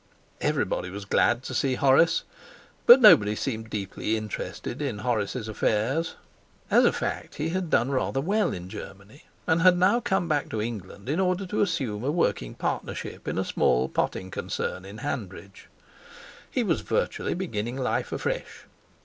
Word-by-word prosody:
Everybody 90 - 0
was 100 +2 -7
glad 120 +5 +2
to - - -6
see 130 -2 +1
Horace, 140 +5 +4 0.6
but 245 +3 +10
nobody 105 - +7
seemed 110 -2 -4
deeply 105 +2 -2
interested 110 +4 -5
in 135 -7 -2
Horace's 110 0 -2
affairs. 115 +9 0 0.6
As - - +6
a - - +5
fact - - -4
he 155 +2 -2
had 180 0 -2
done 125 -2 +2
rather 135 0 0
well 205 +9 +1
in 90 0 -6
Germany, 100 +8 -11 0.2
and 160 +1 +2
had 180 0 +6
now 190 +7 +4
come 190 -6 0
back 150 -3 0
to 110 - -3
England 105 -2 -6
in 150 +6 0
order 185 +1 +1
to 200 +3 -1
assume 120 - -1
a 135 - 0
working 100 - 0
partnership - - -4
in - - -2
a - - 0
small 60 +1 +2
potting 95 0 -2
concern 95 - -4
at 100 +3 -9
Hanbridge. 100 -8 -6 0.8
He - - 0
was - - 0
virtually - - -1
beginning 120 - -3
life 130 - -1
afresh. - - -4
125 Hz, 160 wpm, -26 LUFS, 105-165 Hz, 0.8 s, but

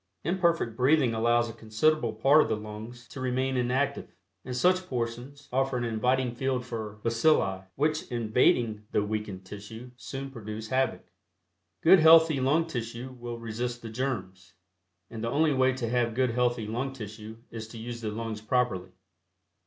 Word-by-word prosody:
Imperfect 170 -8 +1
breathing 130 0 +3
allows 120 +1 +2
a 115 - -7
considerable 115 +4 +1
part 135 +8 +5
of - - 0
the 110 - +1
lungs 110 +3 -9
to 130 - -9
remain 130 +1 0
inactive, 130 +3 -1 0.3
and 125 - -5
such 185 +5 +3
portions 125 +3 -4
offer 135 0 +1
an 120 - -2
inviting 125 +2 +1
field 130 0 -1
for 110 -4 -6
bacilli, 115 -6 +2
which 155 +2 0
invading 115 -2 +2
the 105 - +2
weakened 105 -3 -4
tissue 110 +5 -9
soon 135 +1 -6
produce 110 -2 -7
havoc. 130 +1 0 0.8
Good 185 +3 +8
healthy 160 -2 +7
lung 150 +6 +2
tissue 120 -3 -5
will 120 0 -5
resist 120 +1 -4
the 115 - -6
germs, 95 -8 -4 0.6
and 115 -1 -6
the 115 - 0
only 150 +3 +2
way 130 0 +3
to 125 -2 -3
have 120 -1 +1
good 130 -1 +2
healthy 120 -1 +1
lung 120 +5 -3
tissue 110 -2 -8
is 110 -1 -6
to 115 - -11
use 120 +1 -6
the 110 - -2
lungs 110 0 -4
properly. 110 -5 0
120 Hz, 160 wpm, -28 LUFS, 110-135 Hz, 0.8 s, Good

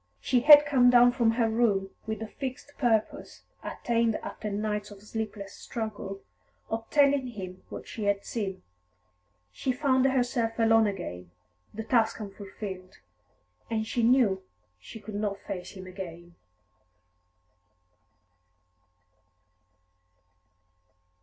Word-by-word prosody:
She 255 - +2
had 295 +3 +9
come 260 -4 +5
down 245 0 +7
from 235 -3 +2
her 230 -1 +2
room 215 -4 +1 0.2
with 220 -1 -3
the 220 - -4
fixed 265 +4 -7
purpose, 225 -5 0 0.2
attained 230 -2 0
after 215 - -5
nights 210 0 -2
of 205 -1 -13
sleepless 210 -2 -5
struggle, 210 -3 -6 0.5
of 225 0 -3
telling 280 -2 +3
him 185 -6 -8
what - - -8
she 215 - -5
had 200 0 0
seen. 195 -5 -4 0.9
She 260 - -2
found 260 0 +2
herself 245 -3 0
alone 225 -1 +4
again, 90 - -5 0.4
the 220 - -6
task 225 -1 +2
unfulfilled. 195 -2 -8 0.7
And 220 -1 -1
she 235 +2 -1
knew 235 -4 +4
that - - -20 0.4
she 225 - -11
could 215 0 -9
not 205 -1 -2
face 180 -2 -7
him 190 -2 -9
again. 175 -2 -9
220 Hz, 120 wpm, -28 LUFS, 200-245 Hz, 0.9 s, had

